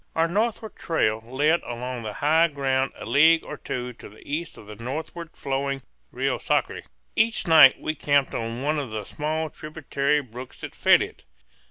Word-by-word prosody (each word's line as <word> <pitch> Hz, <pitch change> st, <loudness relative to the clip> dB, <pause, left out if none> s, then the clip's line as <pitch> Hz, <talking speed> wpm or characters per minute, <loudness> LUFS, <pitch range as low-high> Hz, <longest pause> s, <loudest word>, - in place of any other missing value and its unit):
Our 165 Hz, -, +3 dB
northward 220 Hz, +5 st, -1 dB
trail 110 Hz, -10 st, 0 dB
led 145 Hz, +8 st, +1 dB
along 125 Hz, +1 st, -5 dB
the 110 Hz, -2 st, -5 dB
high 160 Hz, +3 st, +5 dB
ground 135 Hz, -3 st, 0 dB
a -, -, -8 dB
league 160 Hz, +3 st, +5 dB
or 150 Hz, -, -7 dB
two 125 Hz, -3 st, -5 dB
to -, -, -12 dB
the 105 Hz, -, -17 dB
east 155 Hz, +4 st, -4 dB
of -, -, -12 dB
the 105 Hz, -, -9 dB
northward 155 Hz, +8 st, -6 dB
flowing 135 Hz, 0 st, -2 dB, 0.3 s
Rio -, -, -1 dB
Sacre. -, -, 0 dB, 0.3 s
Each 225 Hz, +1 st, +1 dB
night 155 Hz, -6 st, +8 dB
we 155 Hz, -, -2 dB
camped 145 Hz, -2 st, +1 dB
on 115 Hz, +2 st, -4 dB
one 150 Hz, +1 st, +1 dB
of 135 Hz, -4 st, -4 dB
the 110 Hz, -1 st, -4 dB
small 155 Hz, +1 st, -3 dB
tributary 150 Hz, -1 st, -1 dB
brooks 125 Hz, -1 st, -10 dB
that -, -, -7 dB
fed -, -, +5 dB
it. -, -, -10 dB
140 Hz, 180 wpm, -25 LUFS, 125-160 Hz, 0.3 s, night